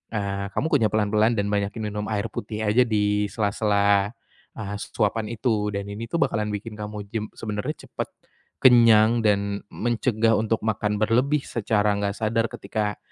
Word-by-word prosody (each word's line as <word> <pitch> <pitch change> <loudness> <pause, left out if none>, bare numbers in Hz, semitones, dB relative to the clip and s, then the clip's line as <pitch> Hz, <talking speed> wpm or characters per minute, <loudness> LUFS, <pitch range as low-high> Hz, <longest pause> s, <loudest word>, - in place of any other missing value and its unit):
eee, 100 -1 -2
kamu - - 0
kunyah 120 -7 +4
pelan-pelan 110 +2 +2
dan 100 - +1
banyakin 105 +2 -1
minum 105 0 -4
air 105 0 -2
putih 105 +1 -4
aja 105 +4 +4
di 105 -1 +1
sela-sela, 100 -1 +2 0.5
eee, 105 -2 -4
suapan 105 +1 -1
itu 110 -2 0
dan 100 - -2
ini 110 +3 -6
tuh - - -1
bakalan 105 -1 -1
bikin 110 +2 -7
kamu 105 0 -5
jem 110 -2 -1
sebenarnya 105 -2 -4
cepat - - -4 0.5
kenyang 115 -2 +6
dan 100 -1 +1
mencegah 115 -1 +1
untuk 110 0 0
makan 105 -1 0
berlebih 125 +7 +1
secara 105 -2 +1
enggak 100 0 -2
sadar 115 +1 0
ketika, 105 -2 -3
105 Hz, 155 wpm, -24 LUFS, 105-115 Hz, 0.5 s, kenyang